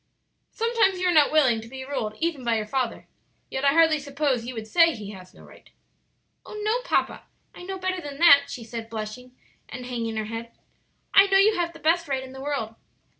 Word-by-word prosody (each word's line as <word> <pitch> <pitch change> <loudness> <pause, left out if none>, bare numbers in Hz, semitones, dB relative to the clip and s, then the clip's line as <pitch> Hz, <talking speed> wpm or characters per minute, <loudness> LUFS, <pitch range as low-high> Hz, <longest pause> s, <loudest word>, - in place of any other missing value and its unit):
"Sometimes 455 -5 +1
you 365 - -1
are 355 - +3
not 300 -3 +5
willing 260 -8 +3
to 225 - -11
be 260 +2 -8
ruled 225 -6 -4
even 320 -3 -2
by 235 -1 +1
your 215 - -3
father; 250 +1 -3 0.4
yet 265 - -3
I 280 - +5
hardly 320 -1 +4
suppose 280 -4 -1
you 250 +1 -6
would 220 -1 -6
say 330 +7 +4
he 210 -2 -8
has 185 -2 -12
no - - -17
right?" - - -17 0.7
"Oh, 425 - -9
no, 445 +4 0
papa; - - -1 0.3
I - - -12
know 380 +2 -6
better 370 0 -3
than 290 -3 -8
that," 285 -4 +7
she 245 - -7
said, 225 0 -7
blushing 230 +3 -7 0.3
and 250 0 -7
hanging 230 -3 -4
her 215 - -2
head; 230 +1 -7 0.6
"I 390 0 +7
know 390 0 +4
you 415 +3 +5
have 340 -1 -2
the - - -13
best 335 +1 +1
right 270 -2 -2
in 260 - -10
the 265 - -9
world." 270 -6 -3
275 Hz, 220 wpm, -25 LUFS, 230-340 Hz, 0.7 s, that